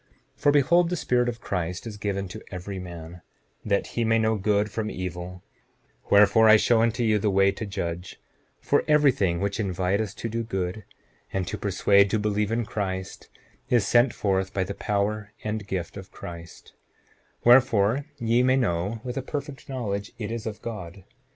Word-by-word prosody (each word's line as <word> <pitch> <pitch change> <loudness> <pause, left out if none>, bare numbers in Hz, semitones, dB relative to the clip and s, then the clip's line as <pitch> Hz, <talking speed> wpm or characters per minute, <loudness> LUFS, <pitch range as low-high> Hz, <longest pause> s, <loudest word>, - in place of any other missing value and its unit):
7:16 - - -29
For 145 - +5
behold, 170 +5 +4
the 180 - -1
Spirit 125 -6 +1
of 120 0 -6
Christ 90 0 -3
is 110 -2 -6
given 100 -1 -2
to - - -8
every 95 +1 -6
man, 85 -1 -9 0.4
that 100 -1 +1
he 120 - 0
may 115 0 +3
know 110 0 +2
good 105 0 +1
from 110 -1 -3
evil; 90 -1 -6 0.7
wherefore, 105 +2 +6
I 110 - +9
show 115 +1 +3
unto 115 +1 +1
you 110 -2 +3
the 105 +1 +1
way 100 0 +4
to 105 +2 -6
judge; 85 -2 -5 0.4
for - - +1
every 150 -2 +5
thing 90 -7 0
which 100 +2 -2
inviteth 95 +1 -1
to - - -4
do 115 +1 -2
good, 95 -2 -4 0.5
and 95 -2 -2
to 105 - -3
persuade 100 0 +3
to 110 - +1
believe 105 0 0
in 115 0 0
Christ, 95 -3 -4 0.4
is 120 -4 +3
sent 120 +1 +4
forth 95 -1 -1
by 95 - +1
the 95 +2 -5
power 105 +1 -2
and 105 -1 -3
gift 90 -4 -4
of 95 0 -10
Christ; 85 -1 -10 0.7
wherefore 120 0 +4
ye 115 -1 +2
may 130 +1 +4
know 105 -2 -1
with 125 0 -5
a - - 0
perfect 140 +1 -6
knowledge 105 -6 -3
it 105 -2 -4
is 115 -1 -4
of 105 -2 -7
God. 95 -5 -7
105 Hz, 185 wpm, -25 LUFS, 95-115 Hz, 0.7 s, I